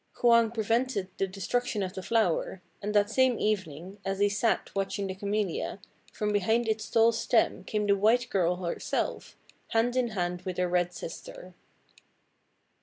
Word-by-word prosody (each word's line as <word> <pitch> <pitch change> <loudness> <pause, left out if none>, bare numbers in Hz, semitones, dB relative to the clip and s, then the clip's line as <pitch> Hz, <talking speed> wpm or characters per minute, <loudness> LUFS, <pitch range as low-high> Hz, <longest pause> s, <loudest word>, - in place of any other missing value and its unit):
Hwang 235 -1 +5
prevented 225 -2 0
the 195 - +1
destruction 205 +3 -2
of 185 -1 -4
the 190 - -5
flower; 190 -4 0 0.2
and 210 +1 -3
that 205 +1 +3
same 260 0 +3
evening, 190 -2 -2
as 195 0 -2
he 205 +1 +3
sat 210 +3 0
watching 195 0 -2
the 190 - -3
Camellia, 200 -2 -2 0.3
from 210 -1 -2
behind 220 +4 +2
its 220 0 -1
tall 230 0 +5
stem 230 0 +1
came 210 -1 -1
the 200 -1 +4
white 225 +4 +3
girl 180 -2 +2
herself, 180 -1 -3 0.3
hand 230 +2 +1
in 255 -1 +2
hand 180 -5 -2
with 185 -1 -5
her 180 0 +1
red 175 0 +1
sister. 180 +1 -9
205 Hz, 160 wpm, -29 LUFS, 185-225 Hz, 0.3 s, Hwang